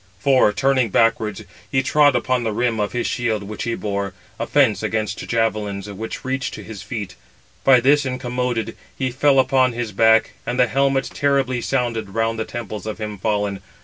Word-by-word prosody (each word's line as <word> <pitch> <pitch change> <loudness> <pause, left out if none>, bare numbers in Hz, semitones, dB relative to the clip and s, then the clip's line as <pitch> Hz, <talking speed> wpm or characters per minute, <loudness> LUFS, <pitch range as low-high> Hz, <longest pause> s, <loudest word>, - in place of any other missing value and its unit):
For, 135 -6 +4
turning 130 0 +2
backwards, 110 -1 +1 0.3
he 130 - +2
trod 145 0 +4
upon 125 +1 +1
the 110 - -1
rim 115 +1 0
of 105 -1 -1
his 120 - -2
shield 110 -4 -1
which 105 +2 -6
he 115 -1 -1
bore, 100 -2 -3 0.2
a - - -2
fence - - +3
against 110 -1 -2
javelins, 105 -3 -1
which 110 +5 -6
reached 130 0 -2
to - - -9
his 110 -3 -9
feet; 100 -3 -5 0.5
by 130 -2 +6
this 145 +4 +4
incommoded, 125 -2 -2 0.2
he 130 -2 -1
fell 135 +2 +3
upon 130 -1 +3
his 115 -2 -3
back, 110 +2 +4
and 125 - -3
the 125 - +6
helmet 135 +3 +1
terribly 135 -3 +1
sounded 120 -6 -2
round 115 0 0
the 110 - -1
temples 110 -2 -6
of 110 - -4
him 105 -2 -6
fallen. 105 -2 -1
115 Hz, 180 wpm, -21 LUFS, 110-130 Hz, 0.5 s, by